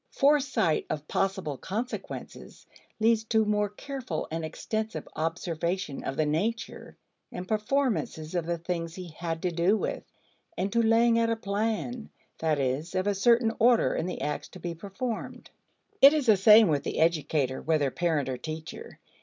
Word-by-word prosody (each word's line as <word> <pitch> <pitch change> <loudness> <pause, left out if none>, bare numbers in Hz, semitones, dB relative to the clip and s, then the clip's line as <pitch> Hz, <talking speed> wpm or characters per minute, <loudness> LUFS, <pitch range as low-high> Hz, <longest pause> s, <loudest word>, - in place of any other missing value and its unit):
Foresight 275 - +2
of 150 0 -4
possible 190 -7 -1
consequences 225 +6 -6 0.3
leads 225 0 +3
to 220 0 +2
more 210 -1 +1
careful 260 +4 -5
and 165 0 -3
extensive 215 +7 -4
observation 165 0 -2
of 135 - -4
the 155 - +2
nature 205 +10 -3 0.3
and 180 +1 -6
performances 215 - -1
of 175 -2 -1
the 170 0 -1
things 165 -1 -4
he 180 -2 -7
had 165 +1 -5
to 180 - +1
do 175 +5 +2
with, - - -3 0.5
and 195 +2 -1
to 235 - +3
laying 230 +1 +4
out 230 0 +2
a 230 - +1
plan 220 +3 -2 0.3
that 160 -2 +1
is, 140 +6 -2
of 185 0 0
a 205 - +2
certain 230 +3 +3
order 235 0 +4
in 170 - -2
the 180 - -5
acts 150 - -3
to 185 - -13
be 175 0 -4
performed. 200 +7 -6 0.5
It 275 +2 +10
is 300 -3 0
the 220 -3 +6
same 210 +3 +7
with 145 -4 +1
the - - -3
educator, 150 -5 +1
whether 150 -4 +1
parent 160 -4 0
or 130 -1 -3
teacher. 160 - -7
190 Hz, 165 wpm, -28 LUFS, 160-225 Hz, 0.5 s, It